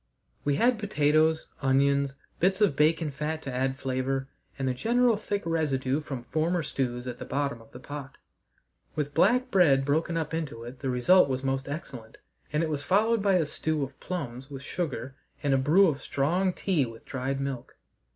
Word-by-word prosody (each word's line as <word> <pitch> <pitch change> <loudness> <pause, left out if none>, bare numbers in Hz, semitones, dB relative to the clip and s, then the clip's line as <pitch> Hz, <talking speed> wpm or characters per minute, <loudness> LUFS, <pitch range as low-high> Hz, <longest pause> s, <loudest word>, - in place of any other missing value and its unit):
We 145 -1 +1
had 235 - +3
potatoes, 155 -5 +2 0.2
onions, 140 +1 +2 0.2
bits 190 +2 +2
of 205 -9 +3
bacon 155 +1 +2
fat 155 +3 -3
to 135 - -5
add 130 +1 0
flavour, 135 0 -2 0.3
and 135 -1 -1
a 130 - +1
general 235 - +3
thick 205 -1 -3
residue 145 -4 0
from 135 -5 -6
former 165 +5 0
stews 125 -4 -2
at 125 -1 -6
the - - -5
bottom 140 -4 -2
of 115 - -18
the 125 - -10
pot; 145 0 -8 0.8
with 145 -2 -2
black 250 - +3
bread 140 -8 +4
broken 160 +4 +1
up 160 -1 -3
into 150 -8 -4
it 125 +2 -9
the 135 - -2
result 140 +7 +5
was 130 0 -2
most 135 0 -1
excellent, 130 -7 -7 0.3
and 150 +2 +1
it 160 - -1
was 150 -2 -2
followed 215 +7 +2
by 200 -1 +3
a 170 -3 +3
stew 150 0 -1
of 135 0 -7
plums 135 -7 -5
with 135 -1 -8
sugar 135 -7 -4 0.3
and 140 -1 +2
a - - +4
brew 165 +9 +5
of 145 -4 -1
strong 175 +10 +1
tea 180 -4 0
with 115 -2 -8
dried 135 +1 -3
milk. 135 -3 -4
145 Hz, 190 wpm, -28 LUFS, 135-165 Hz, 0.8 s, result